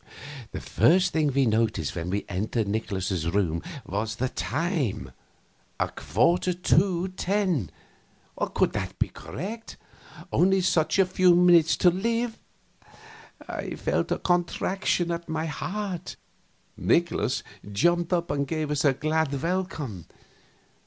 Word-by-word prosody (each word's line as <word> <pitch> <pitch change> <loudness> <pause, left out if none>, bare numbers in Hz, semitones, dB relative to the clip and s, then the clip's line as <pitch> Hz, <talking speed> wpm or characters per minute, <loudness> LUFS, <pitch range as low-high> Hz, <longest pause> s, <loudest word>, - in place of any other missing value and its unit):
The - - -5
first 185 +2 +3
thing 155 -3 +2
we 135 0 +2
noticed 110 - 0
when 85 0 -3
we 100 +2 -2
entered 105 +3 -1
Nikolaus's 95 -5 -2
room 85 -3 0 0.2
was 110 +3 -2
the 130 +2 -1
time 125 - -2 0.7
a - - +1
quarter 170 - +1
to 180 +1 +2
10. 185 - 0 0.7
Could - - 0
that - - -4
be - - 0
correct? 185 - -7 0.6
Only 190 +1 +4
such 170 -2 +2
a 195 - +5
few 180 -1 +4
minutes 175 -2 +5
to 180 - +5
live! 230 +5 -1 1.1
I - - -5
felt - - -1
a - - +2
contraction 175 0 0
at 170 0 -4
my 160 0 -1
heart. 185 +2 -4 0.6
Nikolaus - - +1 0.3
jumped 175 - +2
up 175 -1 0
and 140 -1 -1
gave 155 -1 -2
us 150 -1 0
a 145 -3 +4
glad 155 0 0
welcome. 165 - -3
160 Hz, 125 wpm, -26 LUFS, 110-180 Hz, 1.1 s, a